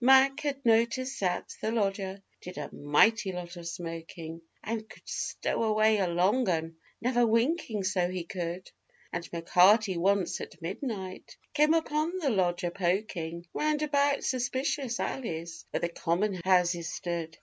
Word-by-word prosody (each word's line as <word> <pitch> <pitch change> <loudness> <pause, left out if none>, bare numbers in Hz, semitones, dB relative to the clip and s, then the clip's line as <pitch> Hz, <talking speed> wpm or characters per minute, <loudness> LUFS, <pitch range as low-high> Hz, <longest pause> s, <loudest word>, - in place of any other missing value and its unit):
Mac. 265 +2 +6
had 280 -3 -3
noticed 235 +4 +2
that 180 -2 -1
the 220 - 0
lodger 195 -3 -1 0.2
did 180 +1 -9
a 150 - -6
mighty 190 +8 +3
lot 180 -1 -6
of 170 -1 -7
smoking, 165 -1 -6 0.2
And 220 0 -4
could - - -16
'stow - - -2
away 215 -1 +3
a 190 - +2
long 190 +8 +2
'un,' 165 -1 -1 0.2
never 245 0 +2
winking, 230 - +1
so 185 -2 +1
he 185 -1 -3
could; 175 +1 -5 0.4
And 175 -1 -4
M'Carty 185 +4 +4
once, 195 +1 +1
at - - -9
midnight, 190 - -5 0.2
came 300 +2 +4
upon 320 +2 0
the 300 -7 +1
lodger 175 -3 +1
poking 175 -2 -2
Round 305 0 +1
about 285 -1 +2
suspicious 260 0 -1
alleys 165 -9 -4
where - - -2
the 170 - 0
common 175 +5 0
houses 175 -2 +2
stood. 165 -2 -4
195 Hz, 150 wpm, -29 LUFS, 175-245 Hz, 0.4 s, Mac